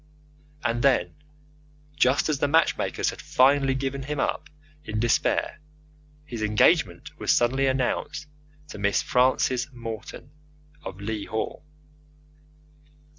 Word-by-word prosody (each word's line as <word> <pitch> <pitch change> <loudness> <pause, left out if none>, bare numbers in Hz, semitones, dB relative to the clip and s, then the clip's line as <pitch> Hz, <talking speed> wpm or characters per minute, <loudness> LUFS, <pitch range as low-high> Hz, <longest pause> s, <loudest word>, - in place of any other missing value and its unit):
And, 120 0 0
then, 120 -11 +2 0.8
just 135 -1 +3
as 150 -3 0
the 145 - +2
matchmakers 160 +3 +1
had - - -10
finally 135 +1 +3
given 135 0 -3
him 145 +1 -4
up - - -2 0.3
in 110 0 -3
despair, 120 +5 +1 0.7
his 120 -6 -6
engagement 105 - +2
was - - +1
suddenly 130 +3 +2
announced 135 +3 -1 0.4
to 105 - -8
Miss 100 0 +1
Frances 130 +1 +1
Morton, 115 -3 -8 0.5
of 95 - -8
Leigh 105 0 -4
Hall. 110 +5 -4
130 Hz, 115 wpm, -25 LUFS, 110-140 Hz, 0.8 s, just